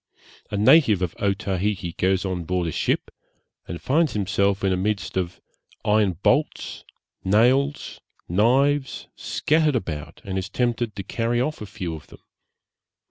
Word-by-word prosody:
A 105 - -3
native 105 - +5
of 90 - -2
Otaheite 95 -2 -1
goes 95 +1 +1
on 90 -2 -2
board 90 +1 -1
a 80 - -2
ship - - -1 0.6
and 85 - -5
finds 155 +3 +1
himself 100 -1 0
in 95 - +2
the - - +2
midst 100 +2 -2
of 90 -1 -2 0.5
iron 105 -3 +3
bolts, - - 0 0.4
nails, 130 +8 +2 0.3
knives, 135 +9 +2
scattered 155 -2 +1
about, 80 - -4
and 95 -1 -2
is 95 - -5
tempted 120 -2 -1
to 100 - -5
carry 115 +4 -1
off 140 +2 -2
a 105 - -6
few 90 -5 -5
of 80 -2 -9
them. - - -16
100 Hz, 145 wpm, -24 LUFS, 95-120 Hz, 0.6 s, native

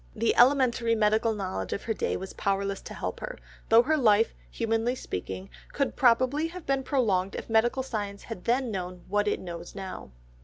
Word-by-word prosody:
The 230 +1 +1
elementary 245 -3 +4
medical 220 +1 +2
knowledge 190 -2 -3
of - - -4
her 225 - -1
day - - -1
was 190 +1 -7
powerless 200 0 -1
to - - -9
help - - -4
her, - - -6 0.3
though 225 +1 +7
her 310 +5 +2
life, 225 -4 +4 0.2
humanly 225 +1 0
speaking, 95 - -6 0.2
could 275 - -1
probably 255 +5 +3
have 350 0 -9
been 275 -1 +1
prolonged 215 -9 +1
if - - -6
medical 240 +4 +3
science 205 -5 -4
had 225 -6 -8
then 245 0 +1
known 180 -2 -5
what 205 +1 +1
it 205 - +1
knows 170 0 -8
now. 190 - -7
225 Hz, 185 wpm, -28 LUFS, 195-250 Hz, 0.3 s, though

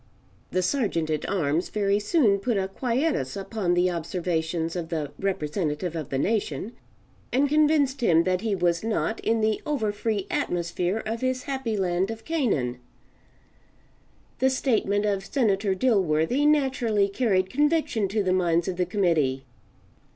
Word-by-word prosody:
The 185 - 0
Sergeant 180 - 0
at 155 - -2
arms 165 -3 0
very 200 -1 +1
soon 210 - +2
put 225 +1 0
a 190 -1 0
quietus 240 - -1
upon 195 -2 -1
the 180 +1 +2
observations 165 -1 -2
of 170 -2 -4
the 155 -4 -3
representative 165 -2 -2
of 155 -4 -4
the 135 - -1
nation, 200 - -1 0.6
and 270 +4 +3
convinced 295 -2 +2
him 170 -7 +4
that 185 0 0
he 220 -3 0
was 175 -1 +1
not 225 0 -1
in 225 0 0
the 215 0 +1
over 260 -9 -1
free 205 -1 -2
atmosphere 175 +4 -1
of 225 +1 -3
his 255 0 -1
Happy 265 -6 -2
Land 185 0 0
of 225 0 -7
Canaan: 180 - 0 1.6
The 265 - +4
statement 215 -6 +1
of 200 -2 0
Senator 200 -6 +1
Dilworthy 200 - +2
naturally 260 -8 +2
carried 195 -3 0
conviction 295 -6 +1
to 205 +2 -1
the 185 -1 +1
minds 170 -2 +1
of 185 -2 -3
the 180 -1 0
committee. 160 -9 +1
200 Hz, 150 wpm, -25 LUFS, 175-230 Hz, 1.6 s, him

